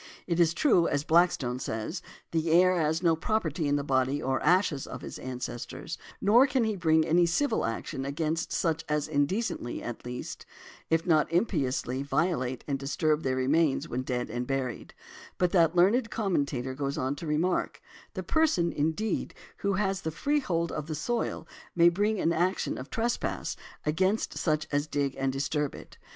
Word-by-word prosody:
It 170 Hz, -1 st, -1 dB
is 170 Hz, -1 st, +4 dB
true, 180 Hz, -, +4 dB
as 145 Hz, 0 st, 0 dB
Blackstone 155 Hz, -7 st, +2 dB
says, 130 Hz, -, -4 dB, 0.3 s
the 165 Hz, 0 st, 0 dB
heir 180 Hz, +3 st, +5 dB
has 160 Hz, 0 st, 0 dB
no 165 Hz, -2 st, +4 dB
property 165 Hz, -4 st, -1 dB
in 145 Hz, -, +2 dB
the 145 Hz, -, 0 dB
body 135 Hz, 0 st, +1 dB
or 135 Hz, -2 st, -1 dB
ashes 180 Hz, -6 st, +2 dB
of -, -, -7 dB
|157| -, -, -14 dB
his -, -, -7 dB
ancestors; 125 Hz, -2 st, -6 dB, 0.2 s
nor 235 Hz, +7 st, +5 dB
can 265 Hz, -3 st, +1 dB
he 220 Hz, -2 st, 0 dB
bring 160 Hz, -3 st, +3 dB
any 170 Hz, +1 st, +4 dB
civil 230 Hz, -, +1 dB
action 115 Hz, +3 st, -3 dB
against 155 Hz, +3 st, -2 dB
such 160 Hz, -1 st, 0 dB
as 150 Hz, -1 st, 0 dB
indecently, 150 Hz, -, -1 dB
at 120 Hz, -, -6 dB
least, 125 Hz, 0 st, -6 dB, 0.5 s
if 165 Hz, 0 st, +2 dB
not 155 Hz, -3 st, +3 dB
impiously, 140 Hz, -, 0 dB
violate 140 Hz, -4 st, -1 dB
and 140 Hz, -2 st, -1 dB
disturb 150 Hz, +2 st, 0 dB
their 130 Hz, -3 st, 0 dB
remains 140 Hz, +3 st, +2 dB
when 125 Hz, -, -2 dB
dead 125 Hz, -2 st, -3 dB
and 120 Hz, +1 st, -3 dB
buried; 135 Hz, -3 st, -3 dB, 0.4 s
but 180 Hz, -1 st, +2 dB
that 170 Hz, -2 st, +4 dB
learned 220 Hz, +7 st, +4 dB
commentator 140 Hz, -, -1 dB
goes 140 Hz, +1 st, -3 dB
on 130 Hz, +2 st, -1 dB
to 165 Hz, -, -6 dB
remark: 165 Hz, +4 st, 0 dB, 0.4 s
"The -, -, -3 dB
person, 300 Hz, -, +2 dB
indeed, 160 Hz, +8 st, -1 dB, 0.2 s
who 200 Hz, 0 st, 0 dB
has 195 Hz, -1 st, 0 dB
the 160 Hz, -, -2 dB
freehold 180 Hz, -, 0 dB
of 155 Hz, -1 st, -4 dB
the 155 Hz, -, -3 dB
soil, 235 Hz, +11 st, -2 dB, 0.3 s
may 170 Hz, 0 st, +7 dB
bring 205 Hz, +4 st, 0 dB
an 165 Hz, -, +2 dB
action 180 Hz, +3 st, 0 dB
of 130 Hz, -, -8 dB
trespass 235 Hz, +1 st, -2 dB, 0.3 s
against 185 Hz, +8 st, +1 dB
such 155 Hz, -2 st, 0 dB
as 145 Hz, +1 st, 0 dB
dig 140 Hz, -2 st, -1 dB
and 135 Hz, 0 st, +1 dB
disturb 140 Hz, +2 st, -1 dB
it". -, -, -13 dB
160 Hz, 175 wpm, -28 LUFS, 140-180 Hz, 0.5 s, may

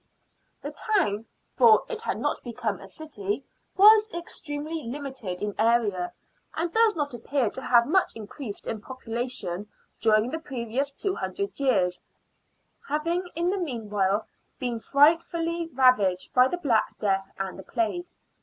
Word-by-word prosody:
The -, -, -4 dB
town 305 Hz, -, 0 dB
— -, -, -45 dB
for 230 Hz, -3 st, +7 dB
it 455 Hz, -2 st, -5 dB
had -, -, -2 dB
not -, -, -1 dB
become 225 Hz, -5 st, -3 dB
a 195 Hz, -, -11 dB
city 215 Hz, -3 st, -4 dB, 0.2 s
— -, -, -42 dB
was 430 Hz, 0 st, +8 dB
extremely 315 Hz, -2 st, -5 dB
limited 255 Hz, -7 st, -5 dB
in 205 Hz, -1 st, -1 dB
area, 220 Hz, -6 st, +2 dB, 0.4 s
and 330 Hz, +1 st, -2 dB
does 450 Hz, -2 st, +4 dB
not 290 Hz, -4 st, -2 dB
appear 240 Hz, 0 st, -1 dB
to 265 Hz, -, -6 dB
have 240 Hz, -2 st, +4 dB
much 375 Hz, +7 st, +2 dB
increased 220 Hz, +1 st, -7 dB
in 220 Hz, -2 st, -4 dB
population 225 Hz, -6 st, -4 dB, 0.3 s
during 220 Hz, +2 st, +3 dB
the 320 Hz, -, -3 dB
previous 265 Hz, -2 st, -2 dB
two 385 Hz, +7 st, -2 dB
hundred 400 Hz, -2 st, -4 dB
years, 195 Hz, -10 st, +2 dB, 0.9 s
having 335 Hz, +5 st, 0 dB
in 345 Hz, +2 st, +1 dB
the 395 Hz, -, -1 dB
meanwhile 210 Hz, -, -1 dB, 0.3 s
been 245 Hz, -3 st, -2 dB
frightfully 330 Hz, +5 st, +2 dB
ravaged 230 Hz, -9 st, +3 dB
by 250 Hz, 0 st, +6 dB
the 355 Hz, -, -2 dB
Black 245 Hz, -10 st, +1 dB
Death 195 Hz, -2 st, 0 dB
and 195 Hz, -1 st, -4 dB
the -, -, -8 dB
Plague. 245 Hz, -, -2 dB
255 Hz, 150 wpm, -26 LUFS, 215-320 Hz, 0.9 s, was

